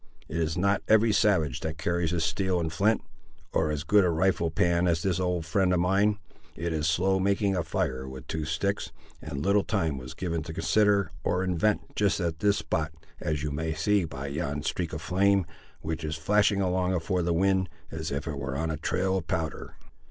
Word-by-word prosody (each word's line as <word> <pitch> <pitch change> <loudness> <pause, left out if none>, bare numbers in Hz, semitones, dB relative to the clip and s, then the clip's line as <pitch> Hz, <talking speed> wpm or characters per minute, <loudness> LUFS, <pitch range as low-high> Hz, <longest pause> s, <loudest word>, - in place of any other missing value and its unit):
It 85 - -4
is 80 0 0
not 100 +2 +2
every 110 +1 +5
savage 90 -11 +2
that 80 0 -4
carries 85 +1 0
his 85 -1 0
steel 90 +4 0
and 80 -1 -2
flint, 105 +6 +2 0.5
or 80 -1 +2
as 75 -1 -2
good 100 +5 +4
a 90 - +3
rifle 85 0 +1
pan 85 +2 +2
as 80 -1 +1
this 95 -2 +1
old 90 -3 -1
friend 90 +3 +2
of 90 - +2
mine. 100 +4 +2 0.4
It 85 +1 -2
is 80 0 0
slow 95 +3 +2
making 100 0 +1
a 90 - +1
fire 65 -4 -2
with 65 0 -9
two 80 +3 -3
sticks, 85 +7 -2 0.3
and 75 -1 -5
little 100 +1 +4
time 80 -10 -1
was 65 0 -9
given 85 -3 -2
to 80 +1 -7
consider, 100 -1 +2
or 90 +1 +1
invent, 95 +3 0
just 100 -1 +2
at 85 -3 -2
this 100 -1 +3
spot, 80 -1 -2 0.3
as 75 -2 -2
you 75 - -2
may 80 +2 -2
see 100 +5 +2
by 70 -4 -6
yon 75 0 -3
streak 85 0 -2
of 80 +1 -5
flame, 95 +1 +3 0.4
which 80 +1 -4
is 75 0 -2
flashing 100 +4 +2
along 90 0 +1
afore 90 +2 0
the 85 0 0
wind, 95 +1 +2 0.2
as 80 0 -4
if 70 +2 -3
it 75 -3 -3
were 70 -1 -3
on 80 0 -1
a 75 - -3
trail 95 +5 0
of 85 -3 -5
powder. 80 -4 -3
85 Hz, 210 wpm, -28 LUFS, 80-95 Hz, 0.5 s, every